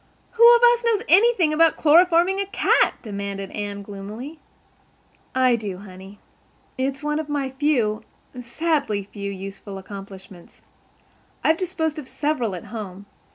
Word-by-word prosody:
"Who 470 Hz, +1 st, +7 dB
of 475 Hz, -, +1 dB
us 480 Hz, 0 st, +5 dB
knows 455 Hz, -2 st, +1 dB
anything 385 Hz, -5 st, +4 dB
about 325 Hz, +1 st, +4 dB
chloroforming 345 Hz, +4 st, +4 dB
a 395 Hz, -, -4 dB
cat?" -, -, +2 dB
demanded 200 Hz, -2 st, -5 dB
Anne 205 Hz, -1 st, -5 dB
gloomily. 215 Hz, +10 st, -8 dB, 1.0 s
"I 255 Hz, -2 st, +4 dB
do, 205 Hz, -5 st, -5 dB
honey. 190 Hz, +1 st, -12 dB, 0.6 s
It's 270 Hz, +2 st, -3 dB
one 300 Hz, +1 st, -1 dB
of 310 Hz, -1 st, -5 dB
my 280 Hz, -2 st, -2 dB
few—sadly 250 Hz, -1 st, -2 dB
few—useful 195 Hz, 0 st, -7 dB
accomplishments. 195 Hz, -2 st, -12 dB, 0.8 s
I've 320 Hz, -, +3 dB
disposed 325 Hz, -4 st, -2 dB
of 280 Hz, -, -9 dB
several 260 Hz, -11 st, -2 dB
at 175 Hz, -, -9 dB
home. 200 Hz, -3 st, -7 dB
255 Hz, 125 wpm, -23 LUFS, 200-320 Hz, 1.0 s, Who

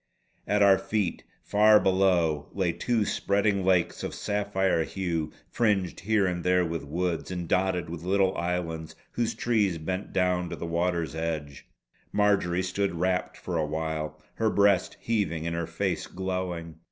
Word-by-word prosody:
At 105 Hz, 0 st, +3 dB
our 95 Hz, -1 st, +6 dB
feet 95 Hz, -1 st, -2 dB, 0.2 s
far 105 Hz, +1 st, +6 dB
below, 90 Hz, -6 st, +2 dB
lay 95 Hz, -3 st, +1 dB
two 110 Hz, +6 st, 0 dB
spreading 100 Hz, -1 st, +1 dB
lakes 90 Hz, -2 st, +2 dB
of -, -, -4 dB
sapphire 100 Hz, -4 st, 0 dB
hue, 85 Hz, -4 st, -2 dB, 0.2 s
fringed 100 Hz, -6 st, 0 dB
here 105 Hz, +2 st, +2 dB
and 90 Hz, -2 st, -2 dB
there 90 Hz, 0 st, +3 dB
with 80 Hz, -2 st, -3 dB
woods, 85 Hz, +3 st, -2 dB
and 90 Hz, -2 st, -4 dB
dotted 90 Hz, -1 st, +1 dB
with 80 Hz, 0 st, -6 dB
little 95 Hz, +1 st, +2 dB
islands 85 Hz, -2 st, -3 dB, 0.2 s
whose 115 Hz, -1 st, -1 dB
trees 105 Hz, -7 st, +1 dB
bent 95 Hz, +5 st, -4 dB
down 90 Hz, -1 st, +1 dB
to -, -, -4 dB
the -, -, -6 dB
water's 85 Hz, -1 st, -1 dB
edge. 80 Hz, -3 st, -4 dB, 0.4 s
Marjory 100 Hz, -3 st, +2 dB
stood 95 Hz, 0 st, -1 dB
rapt 90 Hz, +2 st, -1 dB
for 90 Hz, -2 st, -3 dB
awhile, 75 Hz, 0 st, -3 dB
her 110 Hz, -1 st, +1 dB
breast 100 Hz, -2 st, +3 dB
heaving 90 Hz, -8 st, -1 dB
and 85 Hz, 0 st, -2 dB
her 85 Hz, -1 st, -2 dB
face -, -, -2 dB
glowing. 90 Hz, -3 st, -4 dB
90 Hz, 155 wpm, -27 LUFS, 85-100 Hz, 0.4 s, our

